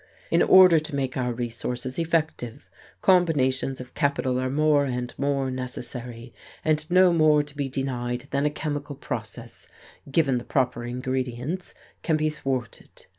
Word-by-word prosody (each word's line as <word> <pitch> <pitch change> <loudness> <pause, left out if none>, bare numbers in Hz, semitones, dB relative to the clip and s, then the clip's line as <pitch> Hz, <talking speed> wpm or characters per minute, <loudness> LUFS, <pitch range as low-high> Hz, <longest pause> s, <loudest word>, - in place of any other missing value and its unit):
In - - +4
order 185 -3 +7
to 155 -1 -6
make 135 -2 -2
our 125 -1 -1
resources 120 +3 -4
effective, 160 -6 -2 0.4
combinations 135 -8 +2
of 125 -1 -10
capital 130 -3 0
are 130 0 -1
more 150 +1 +3
and 125 -2 -3
more 140 -1 0
necessary, 125 -1 -7 0.3
and 155 0 +1
no 180 0 +5
more 155 -2 +4
to 145 0 -13
be 140 -2 -2
denied 125 -1 -3
than 140 +2 +1
a - - +2
chemical 145 -1 -4
process, - - -7 0.4
given 135 -5 +2
the - - -9
proper 125 -3 -1
ingredients, 130 +6 -3 0.3
can 160 -2 +1
be 155 0 0
thwarted. 130 -5 -5
135 Hz, 145 wpm, -25 LUFS, 125-155 Hz, 0.4 s, order